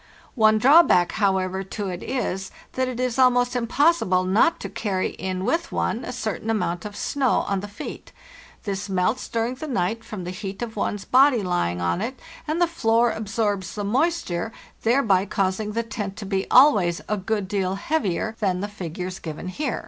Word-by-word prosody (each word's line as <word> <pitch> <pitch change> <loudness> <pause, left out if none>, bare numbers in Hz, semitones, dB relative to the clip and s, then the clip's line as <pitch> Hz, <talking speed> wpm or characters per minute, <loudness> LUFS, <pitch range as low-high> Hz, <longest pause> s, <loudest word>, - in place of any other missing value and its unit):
One 215 -3 +4
drawback, 260 - +6
however, 190 -2 0
to 195 +1 -5
it 180 -1 -5
is, 195 -7 -3 0.2
that 260 0 0
it 250 -1 -4
is 255 0 -1
almost 245 -1 +4
impossible 245 - +2
not 200 - +3
to - - -4
carry 190 -4 -2
in 185 0 -4
with 335 +7 0
one 235 - -1
a - - -5
certain 225 -3 -4
amount 175 -6 -1
of 205 -1 -6
snow 270 +1 +1
on 200 -1 0
the 205 - -6
feet. 205 - -8 0.5
This 200 -1 -4
melts 190 +6 0
during 230 +2 -1
the 280 +5 -7
night 225 -2 -1
from 210 -5 -7
the 180 - -4
heat 195 +3 -6
of 225 -2 -6
one's 205 -1 -2
body 260 -3 +5
lying 90 - -1
on 85 - 0
it, 250 +4 -4 0.3
and 310 +3 -1
the 350 - +5
floor 235 -8 +2
absorbs 205 -3 -2
the 205 - -3
moisture, 225 - 0 0.3
thereby 220 -6 +3
causing 195 +2 -1
the 230 +1 0
tent 210 -3 -5
to 210 - -6
be 195 0 -2
always 205 - +5
a 210 - 0
good 205 0 -2
deal 190 -1 -1
heavier 220 - -1
than 185 -4 0
the 205 - -2
figures 185 -2 -6
given 160 +2 -6
here. 270 +6 -2
210 Hz, 185 wpm, -24 LUFS, 190-245 Hz, 0.5 s, drawback